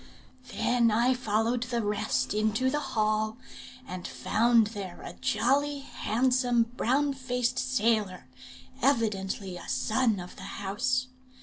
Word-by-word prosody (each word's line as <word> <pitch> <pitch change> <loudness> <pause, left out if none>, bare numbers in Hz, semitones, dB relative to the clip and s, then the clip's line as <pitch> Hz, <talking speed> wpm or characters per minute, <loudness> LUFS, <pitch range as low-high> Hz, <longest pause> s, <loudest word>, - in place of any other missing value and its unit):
Then 240 -1 +2
I 235 +4 +3
followed 230 0 0
the 240 -2 -1
rest 205 0 0
into 215 +5 +1
the 295 - 0
hall, 215 -4 0 0.5
and 180 -1 -6
found 220 - +3
there 195 -4 -6
a - - -7
jolly, 285 +2 +1
handsome, 250 -1 +1
brown 275 +4 +1
faced 250 -1 -1
sailor, 220 - 0 0.6
evidently 200 -7 0
a 175 - -9
son 225 -3 +1
of 180 0 -9
the - - -10 0.2
house. 255 +6 0
230 Hz, 120 wpm, -28 LUFS, 210-255 Hz, 0.6 s, I